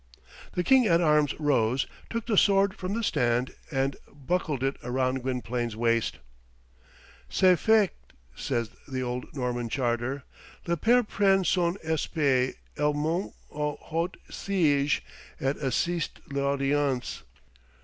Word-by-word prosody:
The 180 - 0
King 260 +2 +5
at 170 -3 +4
Arms 150 -3 +3
rose, 135 -4 +2 0.2
took 230 -1 -3
the 225 - +1
sword 195 0 +4
from 190 0 -4
the 230 - -2
stand, 120 - +1 0.2
and 135 -2 0
buckled 145 -1 -2
it 135 +1 0
round 130 +1 0
Gwynplaine's 120 -2 -2
waist. 115 0 +1 1.1
"Ce 185 -1 +5
faict," 215 - +2 0.2
says 120 - -2 0.2
the 130 -2 -3
old 125 0 -3
Norman 120 -3 -2
charter, 125 +2 -1 0.4
"le 170 - +1
pair 240 +9 +4
prend 195 -3 +2
son 175 0 +2
espée, 145 -5 +1 0.2
et 150 0 +1
monte 160 +6 -1 0.2
aux 150 0 -2
hauts 170 +3 -3
siéges, 150 -7 +1 0.4
et 135 +1 0
assiste 165 +4 -1
a - - -11
l'audience." 140 -1 0
145 Hz, 130 wpm, -27 LUFS, 130-175 Hz, 1.1 s, King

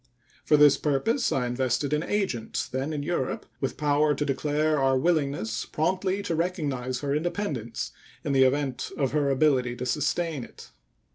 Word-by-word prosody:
For 150 - +4
this 145 -1 +7
purpose 225 - +1
I 130 -2 +1
invested 130 +3 0
an 150 - +2
agent 190 - -2
then 135 +4 -2
in 145 -2 -3
Europe 155 -5 -2
with 135 - -2
power 150 0 +2
to 150 - -1
declare 150 +2 +1
our 135 -1 +3
willingness 140 -8 0
promptly 185 +5 -1
to 185 - -2
recognize 145 -8 -2
her 140 -1 -1
independence 150 - -2 0.3
in - - -1
the 135 -1 +5
event 135 -1 0
of 135 -3 0
her 145 -1 +1
ability 130 -3 +2
to 125 - -5
sustain 150 +2 -1
it. - - -13
145 Hz, 160 wpm, -27 LUFS, 130-155 Hz, 0.3 s, this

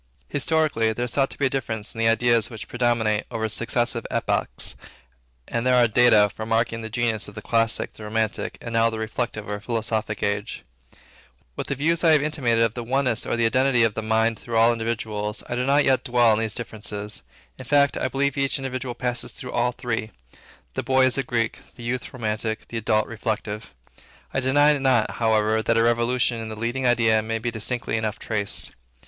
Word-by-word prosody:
Historically, 145 -6 +1
there 120 +3 -2
is 120 - -4
thought 135 -1 +1
to - - -9
be 140 - +1
a - - +3
difference 110 -5 -3
in 115 - -9
the 115 - +3
ideas 115 0 +3
which 110 -4 -8
predominate 120 -3 +1
over 110 -1 -2
successive 115 +1 0
epochs, - - -1 0.7
and 115 -1 -2
there 130 0 +3
are 120 -1 +5
data 110 -2 +5
for 105 +2 -8
marking 115 +1 0
the 110 - -6
genius 115 -1 0
of 105 - -12
the - - -6
Classic, 115 -1 +1
of - - -25
the 110 - -9
Romantic, 110 0 -2
and 115 - -6
now 115 0 +4
of 115 - -2
the - - -3
Reflective 110 -1 -3
or 105 0 -3
Philosophical 110 -1 -2
age. 100 +1 -3 0.9
With - - -4
the 140 - -1
views 160 +5 +1
I 165 -2 +6
have 150 -2 +4
intimated 125 -7 +1
of 115 -2 +1
the 120 - -5
oneness 125 -1 0
or - - 0
the 115 - +2
identity 130 +1 +3
of 115 -2 +2
the 110 - -3
mind 110 +1 +1
through 115 -1 -3
all 115 +1 +6
individuals, 110 -2 -3
I - - -4
do 125 +1 -1
not 140 +1 +4
much 130 -1 +3
dwell 120 -2 +4
on 105 - +2
these 110 -1 -2
differences. 105 -3 -5 0.4
In 130 - -8
fact, 140 +2 +3
I - - 0
believe 140 +1 -1
each 135 0 +1
individual 130 -2 -4
passes 125 0 -1
through 125 - -7
all 120 +1 +1
three. 120 -3 -3 0.6
The - - -2
boy 130 0 +3
is 130 +1 +1
a - - +3
Greek; 115 -3 -1 0.2
the 120 - -11
youth, 125 +1 -3
romantic; 110 -2 -3
the 115 - -4
adult, 110 -1 +1
reflective. 110 - -4 0.6
I - - +1
deny 145 +3 +4
not, 130 -5 +2
however, 110 -1 +2
that 115 +1 +1
a 115 - +4
revolution 120 0 +1
in 110 - -6
the 110 - -6
leading 120 +3 -1
idea 115 -2 +3
may 115 +1 -2
be 120 +1 -3
distinctly 115 +1 -2
enough 110 -2 -2
traced. 105 -3 -1
115 Hz, 210 wpm, -24 LUFS, 110-125 Hz, 0.9 s, I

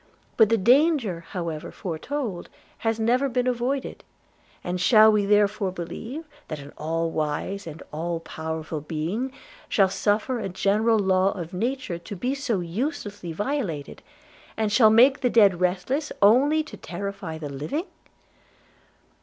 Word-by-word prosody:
But 220 -3 +5
the 230 - +3
danger, 240 - +3
however 165 -4 -4
foretold, 195 - -4 0.3
has 225 0 -1
never 250 +5 +2
been 250 0 0
avoided; 255 +2 -2 0.6
and 180 0 -3
shall 220 +2 +7
we 210 -2 +1
therefore 205 -1 +2
believe, 225 - -6 0.2
that 155 - -5
an 140 0 -11
all 165 +1 -2
wise 160 +6 -3
and 160 0 -8
all 165 +2 -2
powerful 160 -1 -5
Being 170 - -3 0.4
shall 195 -2 +4
suffer 215 +6 0
a 195 -3 -3
general 210 +5 +2
law 190 -1 +2
of 175 -1 -7
nature 230 -3 -2
to 200 +5 -8
be 250 +9 -1
so 270 -9 -1
uselessly 205 - -4
violated, 200 - -3 0.6
and 220 -1 0
shall 220 0 +6
make 250 +5 +6
the 250 - +2
dead 200 -7 +4
restless, 195 - 0
only 275 +10 +5
to 310 - -11
terrify 195 -2 -6
the 150 -2 -6
living?' 150 - -3
200 Hz, 140 wpm, -25 LUFS, 170-245 Hz, 0.6 s, shall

